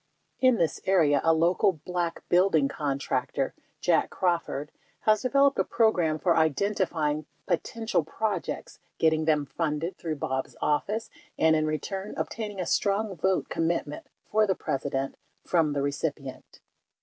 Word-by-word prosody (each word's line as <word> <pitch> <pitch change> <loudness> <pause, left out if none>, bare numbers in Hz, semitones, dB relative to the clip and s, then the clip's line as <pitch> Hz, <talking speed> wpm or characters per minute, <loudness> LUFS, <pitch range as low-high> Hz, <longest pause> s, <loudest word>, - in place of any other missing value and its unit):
In 255 -2 +5
this 165 -5 0
area, 155 -7 +4
a 165 - +5
local 170 +4 +3
Black 175 -2 -3
building 175 -5 +4
contractor 140 -1 -2 0.3
(Jack - - +2
Crawford) 170 -6 -1 0.3
has 215 -1 +3
developed 275 +2 +3
a - - +4
program 180 -9 +2
for 170 +1 +2
identifying 160 -2 0 0.2
potential 225 +5 -1
projects, 220 - -3 0.2
getting 160 -1 +2
them 150 -2 +2
funded 160 +5 -2
through 160 -2 -3
Bob's 130 -2 -3
office 205 +9 -1 0.3
and, 160 0 +4
in 155 0 +1
return, 190 +7 -4
obtaining 210 -3 -4
a 180 - -1
strong 200 +2 0
vote 190 +3 0
commitment 165 -3 -2 0.2
for 215 0 +4
the 190 - +1
Presi 135 -2 -3
dent 135 0 -2 0.3
from 160 -4 +2
the 140 -1 -1
recipient. 140 -1 -4
165 Hz, 135 wpm, -27 LUFS, 150-195 Hz, 0.3 s, In